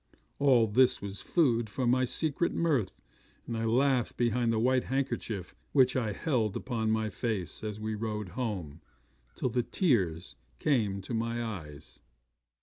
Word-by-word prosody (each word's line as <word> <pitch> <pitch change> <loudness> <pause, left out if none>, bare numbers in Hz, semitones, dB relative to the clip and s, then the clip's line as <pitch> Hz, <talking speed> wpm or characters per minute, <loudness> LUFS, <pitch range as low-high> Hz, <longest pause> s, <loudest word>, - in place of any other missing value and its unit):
All 130 -5 +5
this 120 +4 +4
was 100 0 -6
food 120 -10 +2
for 125 +5 -2
my 130 +2 +3
secret 160 +5 -1
mirth, 145 - 0 0.4
and 115 - -4
I 115 0 -1
laughed 125 +1 +2
behind 120 0 +2
the 115 - +1
white 125 +3 +2
handkerchief 120 -8 -2 0.2
which 130 -2 +5
I 115 -5 0
held 110 -3 0
up - - -8
to 115 -3 -1
my 110 0 +1
face, 110 -8 -3
as 105 -1 -4
we 110 0 -3
rode 105 -2 -3
home, 90 - -4 0.5
till 130 - -1
the 125 +1 +1
tears 90 - 0 0.2
came 110 - +1
into 100 +4 -6
my 115 +1 -1
eyes. 80 -10 -8
115 Hz, 155 wpm, -30 LUFS, 105-130 Hz, 0.5 s, All